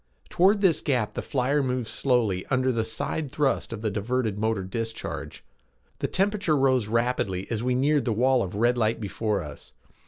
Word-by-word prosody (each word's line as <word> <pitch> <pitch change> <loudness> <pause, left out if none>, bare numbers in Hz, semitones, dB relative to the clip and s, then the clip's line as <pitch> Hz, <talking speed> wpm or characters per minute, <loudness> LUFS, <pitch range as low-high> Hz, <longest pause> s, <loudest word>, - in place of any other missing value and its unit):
Toward 200 +4 +3
this 170 -6 +3
gap 125 -7 0
the - - -3
flyer 140 +2 0
moved 125 -3 -1
slowly 110 -9 +1
under 130 0 +1
the 115 -2 0
side 125 +6 -3
thrust 145 -5 0
of 115 -1 -6
the 110 - 0
diverted 110 0 -1
motor 110 -2 0
discharge. 115 +4 -5 0.6
The - - 0
temperature 195 -5 +1
rose 130 -5 +2
rapidly 115 -5 0
as 110 -2 -1
we 125 +1 0
neared 145 +2 +2
the 120 - +1
wall 125 +3 +3
of 95 -3 -4
red 120 +3 +2
light 110 0 +1
before 105 -2 -2
us. 75 -1 -11
120 Hz, 180 wpm, -26 LUFS, 110-135 Hz, 0.6 s, Toward